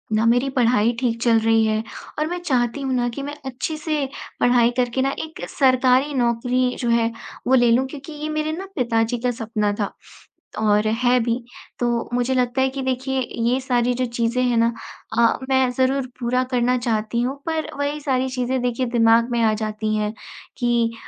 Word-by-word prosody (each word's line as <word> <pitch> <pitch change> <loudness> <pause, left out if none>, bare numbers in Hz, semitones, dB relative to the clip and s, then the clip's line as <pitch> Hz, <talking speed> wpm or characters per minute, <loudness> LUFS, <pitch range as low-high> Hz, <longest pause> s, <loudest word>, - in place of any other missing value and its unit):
ना 220 +1 +2
मेरी 245 +4 +3
पढ़ाई 235 -2 +3
ठीक 230 -2 -1
चल 230 -2 +4
रही 225 0 +3
है 215 0 0 0.4
और 305 - +1
मैं 355 +2 -3
चाहती 255 -4 0
हूँ 265 -1 -1
ना 245 -1 +1
कि - - -2
मैं 290 +1 -5
अच्छे 265 +4 -3
से 305 -2 -1 0.3
पढ़ाई 245 -1 +4
करके 250 +1 +1
ना 275 +1 +1
एक 315 -1 -8
सरकारी 260 +1 +3
नौकरी 250 0 +1
जो 240 - -1
है 235 0 +2 0.4
वो 260 - +3
ले 240 -2 +4
लूँ 250 +3 +3
क्योंकि 280 +2 -9
ये 300 +1 -5
मेरे 310 0 -1
ना 385 - -5
पिताजी 235 -2 +1
का 245 - +2
सपना 210 -2 0
था 205 - -2 0.7
और 210 0 +2
है 245 +3 +2
भी। 230 0 0 0.4
तो 245 - +1 0.3
मुझे 245 +1 +1
लगता 250 0 +1
है 265 - +3
कि 270 +1 -5
देखिए 260 +1 -1 0.3
ये 255 - +2
सारी 245 -1 +1
जो 255 +1 0
चीज़ें 235 +1 -1
हैं 245 -1 +1
ना 230 0 +3 0.5
अ, 235 -1 +4
मैं 260 -1 +3
ज़रूर 260 0 +2
पूरा 250 +1 +1
करना 250 +1 +2
चाहती 235 -1 -1
हूँ, 255 +3 -1
पर 320 -1 -1
वही 285 +1 -1
सारी 260 -2 0
चीज़ें 255 0 -1
देखिए 250 +1 -1
दिमाग़ 230 -1 +4
में 235 - +1
आ 220 - +3
जाती 215 0 -2
हैं 210 0 -1 0.4
कि 235 -2 +1
245 Hz, 195 wpm, -22 LUFS, 230-265 Hz, 0.7 s, चल